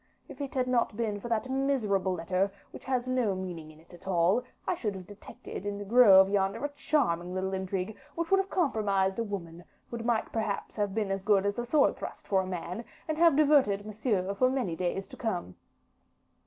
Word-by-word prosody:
If - - -10
it 280 -1 -5
had 255 -1 +2
not 235 -4 +1
been 215 -3 -1
for 240 - -7
that 230 +2 0
miserable 255 -9 +1
letter, 185 +3 0 0.2
which - - -11
has 255 -1 -1
no 250 -6 +1
meaning 175 -4 -6 0.2
at 175 +1 -14
all 180 +4 +3
in - - -13
it, - - -27
I - - +1
should 215 - -3
have 185 -1 -8
detected 205 -1 -9
in 205 0 -3
the 205 - -6
grove 200 -4 +7
yonder 195 +5 0
a - - -1
charming 185 - 0
little 190 +1 -2
intrigue, 190 +2 -3 0.2
which 335 +1 -3
would 390 - +6
have 390 0 -1
compromised 205 - +1
a - - +1
woman, 175 -5 -6 0.3
would 235 -1 -4
have 230 -1 0
perhaps 215 -3 -3
have 205 -2 -1
been 210 -3 0
as 195 0 -1
good 200 0 +3
as 205 +3 -1
a 240 - -3
sword 295 +3 +3
thrust - - -8
for 195 -2 +3
a 185 - -5
man, 180 +4 -5 0.2
and 310 0 -2
have 335 -4 +6
diverted 280 -10 +4
Monsieur 210 -3 -1
for 255 +6 +3
many 250 -11 -1
days 180 +3 -2
to - - -12
come." 180 - -3
205 Hz, 210 wpm, -29 LUFS, 190-250 Hz, 0.3 s, grove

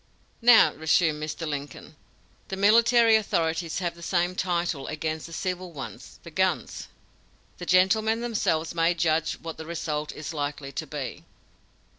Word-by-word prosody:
"Now," 240 -1 +7
resumed 160 0 +1
Mr. 155 +2 -4
Lincoln, 145 -1 -6 0.5
"the 190 - -5
military 230 +3 +5
authorities 165 -5 0
have 175 -1 -2
the 170 - -15
same 175 +1 0
title 175 -5 -1
against 155 +1 -4
the - - -13
civil 180 +1 -4
ones 140 -4 -9
the - - -10
guns! - - -1 0.7
The 175 - -7
gentlemen 215 +5 +3
themselves 170 -9 -1
may 170 +1 +2
judge 160 -1 +1
what 165 -1 -8
the 160 - -7
result 155 -3 -3
is 155 +1 -7
likely 145 -2 -4
to - - -5
be!" - - -6
170 Hz, 145 wpm, -26 LUFS, 155-185 Hz, 0.7 s, Now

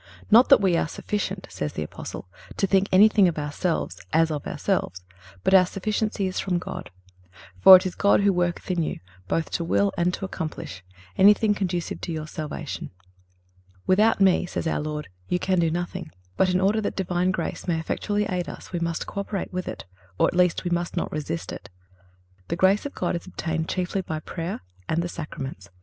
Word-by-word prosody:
"Not 235 +4 +7
that 275 - +7
we 190 -3 +3
are - - +1
sufficient," 195 +1 -3
says 75 -5 -4
the 75 - -3
Apostle, 75 - -8 0.3
"to - - +2
think 195 0 +2
anything 205 0 +6
of 170 - -1
ourselves, 150 +3 -2
as 160 0 +3
of 150 -2 -4
ourselves; 90 +1 -2 0.4
but - - +2
our 185 -2 +7
sufficiency 210 +1 -1
is 185 0 -2
from 180 -2 0
God."(325) 90 - -11
"For 190 - +12
it 185 - +4
is 185 - -2
God 200 0 +3
who 200 -1 +3
worketh 175 +1 -1
in 175 -2 +1
you, 160 - -3 0.3
both 165 - -1
to 170 - -1
will 200 +4 +2
and 175 +1 +1
to - - -5
accomplish"(326) 155 - -6 0.4
anything 210 +2 +6
conducive 180 -4 -3
to - - -4
your 155 -1 -4
salvation. 155 -1 -6 1.0
"Without 210 +4 +4
Me," 190 -2 +4
says - - -4
our 160 - 0
Lord, 150 0 -4 0.2
"you 180 - +2
can 185 0 +1
do 165 -1 +3
nothing."(327) 175 0 -4 0.3
But 190 - +3
in 180 0 +2
order 205 +3 +2
that 205 - -3
Divine 180 -1 0
grace 190 - -3
may 165 -2 +1
effectually 205 +5 -1
aid 180 -2 -2
us - - -10
we 175 - -2
must 170 -1 -2
co 200 - -5
operate 200 -2 -4
with 185 0 -3
it, - - -6 0.3
or - - +4
at - - -3
least 180 -2 +3
we 175 - -2
must 175 0 -1
not - - -1
resist 145 - -4
it. - - -9 0.8
The 170 - -1
grace 190 +8 +3
of 285 - -13
God 180 - -1
is 170 - -6
obtained 160 -3 -3
chiefly 185 +1 -1
by 160 -4 -4
prayer 165 +3 -5 0.3
and 170 +2 +1
the - - -2
Sacraments. 135 - -7
180 Hz, 200 wpm, -25 LUFS, 160-190 Hz, 1.0 s, For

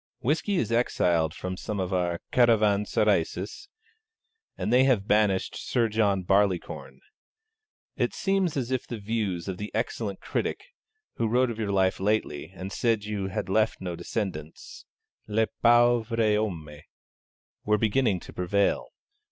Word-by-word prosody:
Whisky 160 - 0
is 120 - 0
exiled 85 -9 +2
from 90 +1 -4
some 105 +2 -4
of 95 0 -2
our 90 -2 0
caravanserais, 105 -5 +3 1.3
and 115 - -1
they 125 +1 +6
have 115 -7 +2
banished 105 -3 +2
Sir 115 -2 0
John 105 -3 +1
Barleycorn. 95 -1 0 1.0
It - - 0
seems 195 -5 0
as 130 -2 -2
if 130 -2 -1
the 120 - -5
views 100 -5 -2
of 95 -2 -4
the 105 +2 -5
excellent 110 -3 -2
critic - - -3 0.5
(who 115 - +1
wrote 120 +1 +2
your 105 -2 -2
life 95 -1 +2
lately, 100 -7 -1
and 95 +1 -8
said 115 0 +1
you 105 -2 -3
had 95 - -3
left 110 +3 +1
no 90 -2 -4
descendants, 85 -7 -5 0.4
le 110 +1 +2 0.2
pauvre 120 -1 +4 0.2
homme) 90 -8 -2 0.9
were 105 0 +2
beginning 110 -2 +1
to - - -11
prevail. 100 +3 0
105 Hz, 135 wpm, -27 LUFS, 95-115 Hz, 1.3 s, they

